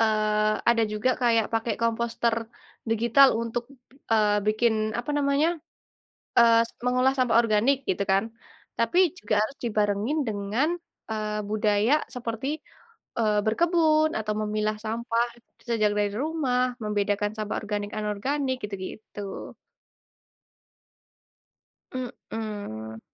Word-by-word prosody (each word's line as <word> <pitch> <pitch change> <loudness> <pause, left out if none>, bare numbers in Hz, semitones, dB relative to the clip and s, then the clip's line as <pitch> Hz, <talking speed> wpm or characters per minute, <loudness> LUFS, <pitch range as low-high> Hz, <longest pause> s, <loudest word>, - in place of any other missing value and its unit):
eee, 215 -1 +2
ada 235 -1 +4
juga 215 +4 +1
kayak 230 -3 +2
pakai 225 0 0
komposter 230 0 0 0.5
digital 235 +4 +5
untuk, 230 +1 -2 0.5
eee, 210 -1 +4
bikin 215 0 +1
apa 240 +4 -4
namanya, 290 +4 +2 0.8
eee, 230 -1 +7
s - - -18
mengolah 255 +1 +3
sampah 245 -3 +3
organik 230 +4 +3
gitu 190 - +1
kan, 195 +3 +1 0.5
tapi 345 +9 +3
juga 210 -9 +1
harus 245 +6 -2
dibarengin 210 +5 0
dengan, 210 +8 0 0.4
eee, 215 -1 -2
budaya 215 +6 +2
seperti, 250 +6 -3 0.6
eee, 210 -2 +3
berkebun 315 +4 +3
atau 215 -1 -1
memilah 215 0 -1
sampah, 230 +2 -1 0.3
bisa 235 -1 -2
aja 210 -1 +2
dari 205 -1 0
rumah, 255 -3 0
membedakan 205 0 -1
sampah 215 -1 -3
organik, 205 -1 -4
anorganik 260 +6 -1
gitu-gitu. 200 0 -7 2.4
Mhm. 210 - -6
225 Hz, 110 wpm, -26 LUFS, 210-250 Hz, 2.4 s, eee